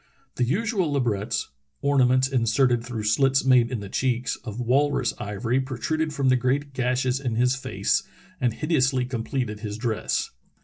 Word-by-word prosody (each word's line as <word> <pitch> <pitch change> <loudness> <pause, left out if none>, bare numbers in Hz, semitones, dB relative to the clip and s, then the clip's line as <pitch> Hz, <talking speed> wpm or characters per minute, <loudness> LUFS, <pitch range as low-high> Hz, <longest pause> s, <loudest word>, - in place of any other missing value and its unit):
The 125 - +2
usual 190 - 0
labrets 115 -5 -1 0.3
(ornaments 130 -2 +3
inserted 120 -1 +2
through 120 -3 -5
slits 135 +5 +2
made 125 -3 +5
in 125 -4 -3
the 100 - -6
cheeks) 125 +3 -1
of 110 0 -8
walrus 130 0 +1
ivory 110 +5 -1
protruded 145 +5 -2
from 140 -3 +1
the 130 - +5
great 135 +3 0
gashes 125 0 0
in 125 -5 -2
his 125 +3 +2
face 135 - 0 0.4
and 125 -2 +1
hideously 135 -2 +1
completed 120 -2 -3
his 105 -1 -5
dress. 110 -2 -1
125 Hz, 150 wpm, -25 LUFS, 115-135 Hz, 0.4 s, made